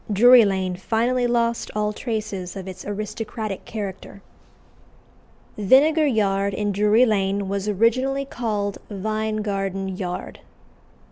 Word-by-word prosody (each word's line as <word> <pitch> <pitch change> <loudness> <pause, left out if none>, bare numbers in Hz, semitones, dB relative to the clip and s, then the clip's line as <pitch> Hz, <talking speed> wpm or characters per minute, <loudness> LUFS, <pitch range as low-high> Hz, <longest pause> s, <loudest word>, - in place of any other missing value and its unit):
Drury 240 +3 +7
Lane 190 -2 -1
finally 240 +5 0
lost 235 -1 0
all 210 0 0
traces 210 -6 -4
of 190 -1 -7
its 185 -1 -8
aristocratic 215 0 -5
character. 200 -2 -7 1.4
Vinegar 295 +9 +4
Yard, 200 -5 +1
in 205 -1 -1
Drury 210 +4 +4
Lane, 200 -2 0
was 200 +1 -2
originally 255 +7 +1
called 210 -6 -3
Vine 215 +1 -2
Garden 195 -2 -2
Yard. 180 -1 -5
210 Hz, 115 wpm, -23 LUFS, 195-230 Hz, 1.4 s, Drury